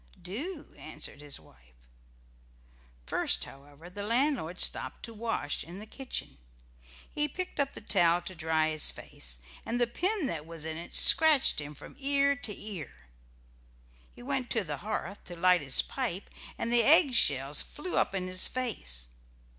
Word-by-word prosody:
"Do," 225 Hz, -, -5 dB
answered -, -, -4 dB
his 145 Hz, -1 st, -3 dB
wife. 65 Hz, 0 st, -22 dB, 1.3 s
First, -, -, 0 dB
however, 145 Hz, +4 st, -13 dB
the 190 Hz, +3 st, -8 dB
landlord 230 Hz, -, 0 dB
stopped -, -, +1 dB
to 230 Hz, -, -6 dB
wash 220 Hz, -9 st, -2 dB
in 175 Hz, +3 st, -10 dB
the 210 Hz, -, -8 dB
kitchen. 260 Hz, -, -6 dB, 0.7 s
He 295 Hz, 0 st, 0 dB
picked 365 Hz, +4 st, -6 dB
up 280 Hz, -1 st, 0 dB
the -, -, -9 dB
towel 175 Hz, -4 st, +3 dB
to 185 Hz, -, -6 dB
dry 160 Hz, -2 st, +1 dB
his 155 Hz, -1 st, +3 dB
face, -, -, -6 dB, 0.3 s
and 235 Hz, +2 st, -2 dB
the 240 Hz, -, +4 dB
pin 365 Hz, -, -1 dB
that 160 Hz, -, -4 dB
was 165 Hz, -2 st, -6 dB
in 160 Hz, 0 st, -4 dB
it 170 Hz, +2 st, -7 dB
scratched 310 Hz, -, +7 dB
him 145 Hz, +1 st, -8 dB
from -, -, -12 dB
ear 280 Hz, 0 st, +2 dB
to 245 Hz, -4 st, -4 dB
ear. 195 Hz, -8 st, -7 dB, 1.2 s
He -, -, -13 dB
went 265 Hz, -2 st, -1 dB
to 225 Hz, -, +1 dB
the 150 Hz, -5 st, -5 dB
hearth 200 Hz, 0 st, -5 dB
to 175 Hz, -, -8 dB
light 180 Hz, 0 st, +4 dB
his 135 Hz, -2 st, +2 dB
pipe 225 Hz, -8 st, -4 dB, 0.3 s
and 235 Hz, -, -2 dB
the 240 Hz, -, +5 dB
egg 285 Hz, +2 st, +6 dB
shells 140 Hz, -, +3 dB
flew 350 Hz, +4 st, -5 dB
up -, -, +1 dB
in 185 Hz, -1 st, -2 dB
his 185 Hz, 0 st, +2 dB
face. 60 Hz, -, -3 dB
195 Hz, 165 wpm, -30 LUFS, 160-255 Hz, 1.3 s, scratched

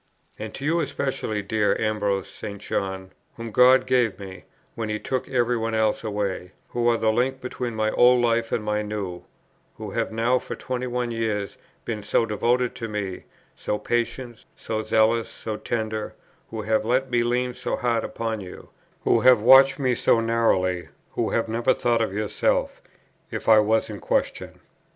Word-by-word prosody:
And 110 Hz, 0 st, -5 dB
to 135 Hz, -, -6 dB
you 165 Hz, +3 st, +2 dB
especially, 135 Hz, -8 st, -2 dB
dear 105 Hz, +1 st, +1 dB
Ambrose 105 Hz, -3 st, 0 dB
St. 100 Hz, -1 st, -8 dB
John; 95 Hz, -1 st, -3 dB, 0.3 s
whom 115 Hz, -1 st, -6 dB
God 130 Hz, +3 st, +6 dB
gave 125 Hz, -5 st, +2 dB
me, 95 Hz, -2 st, -10 dB, 0.3 s
when 110 Hz, -2 st, -4 dB
He 105 Hz, -, -1 dB
took 130 Hz, +3 st, -3 dB
every 125 Hz, -2 st, +1 dB
one 115 Hz, -1 st, -2 dB
else 110 Hz, 0 st, +1 dB
away; 100 Hz, -4 st, -3 dB, 0.2 s
who 120 Hz, -1 st, 0 dB
are 115 Hz, -, +3 dB
the 110 Hz, -1 st, +2 dB
link 130 Hz, +3 st, 0 dB
between 125 Hz, -2 st, -5 dB
my 110 Hz, 0 st, 0 dB
old 125 Hz, 0 st, +5 dB
life 115 Hz, -1 st, +1 dB
and 110 Hz, -, -1 dB
my 105 Hz, 0 st, 0 dB
new; 105 Hz, -4 st, -5 dB, 0.5 s
who -, -, -6 dB
have -, -, -2 dB
now 115 Hz, +3 st, +2 dB
for -, -, -7 dB
twenty 125 Hz, -1 st, -4 dB
one 120 Hz, -1 st, -2 dB
years 110 Hz, -3 st, -2 dB, 0.3 s
been 110 Hz, -3 st, -3 dB
so 105 Hz, +3 st, +1 dB
devoted 120 Hz, +3 st, 0 dB
to 115 Hz, -, -4 dB
me, 105 Hz, -4 st, -4 dB, 0.3 s
so 105 Hz, -, -2 dB
patient, 120 Hz, +1 st, -3 dB
so 110 Hz, -1 st, -3 dB
zealous, 110 Hz, +1 st, +2 dB
so 110 Hz, -, -6 dB
tender; 110 Hz, -1 st, -3 dB, 0.3 s
who 110 Hz, -1 st, -5 dB
have 110 Hz, +1 st, +1 dB
let 130 Hz, +3 st, 0 dB
me 120 Hz, -1 st, +3 dB
lean 125 Hz, +1 st, 0 dB
so -, -, -3 dB
hard 120 Hz, -2 st, 0 dB
upon 110 Hz, -2 st, -3 dB
you; 90 Hz, -1 st, -11 dB, 0.3 s
who -, -, +3 dB
have 125 Hz, -4 st, +6 dB
watched 135 Hz, +2 st, +7 dB
me 130 Hz, -3 st, +1 dB
so 115 Hz, -, +3 dB
narrowly; 110 Hz, -6 st, +1 dB, 0.2 s
who -, -, -1 dB
have 115 Hz, -, 0 dB
never 115 Hz, +3 st, +1 dB
thought 120 Hz, -1 st, +1 dB
of 110 Hz, -, 0 dB
yourself, 105 Hz, +1 st, -1 dB, 0.5 s
if -, -, -6 dB
I 110 Hz, -1 st, +7 dB
was 110 Hz, +1 st, +2 dB
in -, -, -7 dB
question. -, -, -2 dB
115 Hz, 180 wpm, -24 LUFS, 105-125 Hz, 0.5 s, watched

